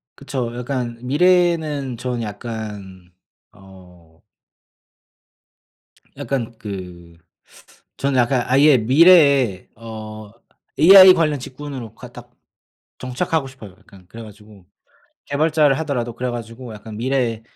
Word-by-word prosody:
그쵸. 130 -4 -5
약간 125 -2 -4
미래에는 155 -3 +1
저는 120 0 -4
약간 105 -4 -8 0.4
어 90 -3 -19 2.0
약간 120 -4 -4
그 90 -5 -9 0.8
저는 135 -2 0
약간 120 +1 +1
아예 140 +2 +4
미래에 140 - +4
어 110 -1 -10 0.5
AI 185 +3 +9
관련 155 -5 0
직군으로 130 -4 -9
가 125 +1 -12
딱 120 0 -13 0.7
정착하고 135 +3 -2
싶어요. 130 -7 -13
약간 95 -2 -19
그래 115 +4 -11
가지고 105 -2 -16 0.6
개발자를 150 -1 +1
하더라도 125 -7 -3
그래 125 +1 -4
가지고 120 0 -8
약간 105 0 -11
미래에 120 -2 -2
120 Hz, 230 characters per minute, -20 LUFS, 110-140 Hz, 2.0 s, AI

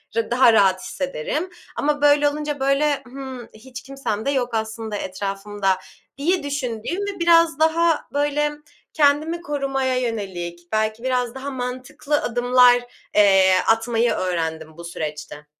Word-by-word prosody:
r 230 0 -1
daha 240 -2 +5
rahat 190 -3 +4
hissederim 280 - -3 0.3
ama 290 0 0
böyle 290 0 +5
olunca, 295 -1 -4
böyle, 275 +1 +1
"Hımm, 260 -2 -8
hiç 250 +4 -11
kimsem 270 -6 -4
de 280 - +1
yok 250 -3 0
aslında 220 -1 -3
etrafımda." 195 0 -2 0.4
diye 340 +3 0
düşündüğüm 275 - -3
ve 405 -1 -4
biraz 335 -3 +4
daha, 325 +1 +2
böyle, 295 +1 +1 0.4
kendimi 310 +3 +2
korumaya 270 -4 -1
yönelik, 190 -8 -4
belki 215 +2 -1
biraz 250 -1 -1
daha 270 +2 -5
mantıklı 260 +4 -3
adımlar, 245 +1 +4 0.3
eee, 195 -2 +5
atmayı 225 +1 +2
öğrendim 160 -3 -3
bu 170 - -9
süreçte. 150 -3 -6
250 Hz, 130 wpm, -22 LUFS, 210-290 Hz, 0.4 s, daha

